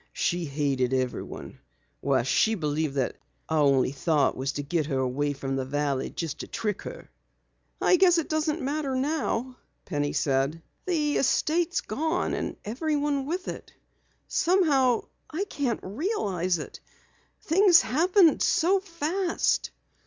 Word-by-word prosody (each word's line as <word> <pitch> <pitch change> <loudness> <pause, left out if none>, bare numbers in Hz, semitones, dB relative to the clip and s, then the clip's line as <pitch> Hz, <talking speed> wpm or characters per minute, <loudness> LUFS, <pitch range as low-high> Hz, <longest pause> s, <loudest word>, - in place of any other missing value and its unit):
She 175 0 0
hated 135 -3 0
everyone. 130 -1 -4 0.4
Why, 135 -3 +1
she 220 - +2
believed 150 -4 -1
that 135 -2 -1 0.3
our 160 -1 +1
only 135 -3 +3
thought 145 +1 +1
was 135 +2 -2
to 145 - -3
get 155 +1 -1
her 135 -4 -1
away 135 +3 0
from 135 -1 -4
the 135 - -1
valley 140 0 -1
just 160 -3 -5
to - - -6
trick 210 -3 -3
her." - - -9 0.7
"I 365 - +4
guess 355 -1 +5
it 330 - 0
doesn't 310 0 -1
matter 280 -1 -1
now," 260 -3 -1 0.3
Penny 145 -4 -2
said. 140 +4 0 0.2
"The 300 -5 +1
estate's 325 +6 +1
gone 320 - -1
and - - -3
everyone 285 +3 -1
with 360 +4 -3
it. - - -7 0.5
Somehow 290 -9 +3 0.3
I 330 +5 -2
can't 280 - -2
realize 195 - -1
it 150 - -8 0.6
things 355 +1 +5
happened 330 - +3
so 375 +4 +3
fast." 345 0 -1
225 Hz, 140 wpm, -27 LUFS, -, 0.7 s, guess